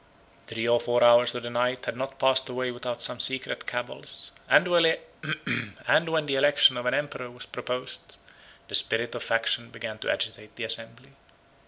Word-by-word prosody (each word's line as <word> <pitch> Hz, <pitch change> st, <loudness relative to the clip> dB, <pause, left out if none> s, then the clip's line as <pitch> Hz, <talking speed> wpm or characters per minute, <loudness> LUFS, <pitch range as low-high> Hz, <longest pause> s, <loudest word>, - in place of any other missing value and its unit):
Three 115 Hz, +1 st, -3 dB
or 120 Hz, 0 st, +4 dB
four 120 Hz, 0 st, +1 dB
hours 120 Hz, 0 st, +6 dB
of 120 Hz, -, -5 dB
the 120 Hz, -, -5 dB
night 125 Hz, +1 st, -1 dB
had -, -, -3 dB
not 135 Hz, +2 st, -5 dB
passed 130 Hz, 0 st, +2 dB
away 125 Hz, 0 st, -2 dB
without 120 Hz, -1 st, -3 dB
some 120 Hz, -, +2 dB
secret 130 Hz, 0 st, -1 dB
cabals; 120 Hz, 0 st, -6 dB, 0.2 s
and -, -, +5 dB
when 170 Hz, -2 st, +4 dB, 1.3 s
the 140 Hz, -2 st, -1 dB
election 145 Hz, -1 st, +5 dB
of 125 Hz, 0 st, -3 dB
an -, -, +2 dB
emperor 145 Hz, -4 st, -4 dB
was 125 Hz, 0 st, -9 dB
proposed, 125 Hz, +1 st, -6 dB, 0.5 s
the -, -, -13 dB
spirit 120 Hz, +1 st, +3 dB
of -, -, -5 dB
faction 115 Hz, +1 st, 0 dB
began 115 Hz, -1 st, -7 dB
to -, -, -4 dB
agitate 105 Hz, +1 st, -4 dB
the 120 Hz, -, -6 dB
assembly. 115 Hz, +4 st, -2 dB
125 Hz, 170 wpm, -26 LUFS, 120-130 Hz, 1.3 s, hours